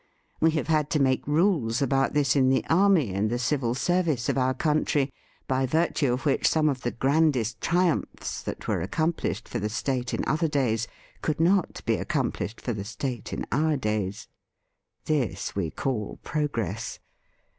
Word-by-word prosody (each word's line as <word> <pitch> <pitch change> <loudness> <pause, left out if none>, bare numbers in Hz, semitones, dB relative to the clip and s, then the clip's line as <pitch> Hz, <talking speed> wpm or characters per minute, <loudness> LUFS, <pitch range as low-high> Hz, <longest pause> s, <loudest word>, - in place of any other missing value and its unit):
We 160 - +4
have - - -1
had 155 -2 +1
to - - 0
make 130 -1 +1
niles 150 - +2
about 135 0 +1
this 145 -1 +3
in 130 -2 +4
the 130 - +2
army 170 - +4
and 100 +3 0
the 120 - 0
Civil 125 -1 0
Service 155 -4 +1
of - - +1
our 130 -1 +1
country, 150 -1 +1 0.3
by 130 0 +1
virtue 155 -2 +1
of 130 +5 -4
which 140 -2 +3
some 155 -1 +3
of 130 -3 -2
the 120 - -1
grandest 130 -4 +1
triumphs 175 -1 0
that - - -6
were - - 0
accomplished 155 - -1
for 120 - -3
the 105 0 -2
State 125 +2 -2
in - - -1
other 160 +2 +1
days 120 -7 0 0.3
could 155 -1 -1
not 180 +2 +2
be - - +2
accomplished 110 - -2
for 120 - -3
the 100 -2 -4
State 120 +2 -5
in - - -3
our 155 0 +2
days. 105 -5 -2 0.8
This 125 -11 -1
we 95 -5 -1
call 110 - -3
progress. 115 - -2
135 Hz, 170 wpm, -26 LUFS, 115-155 Hz, 0.8 s, We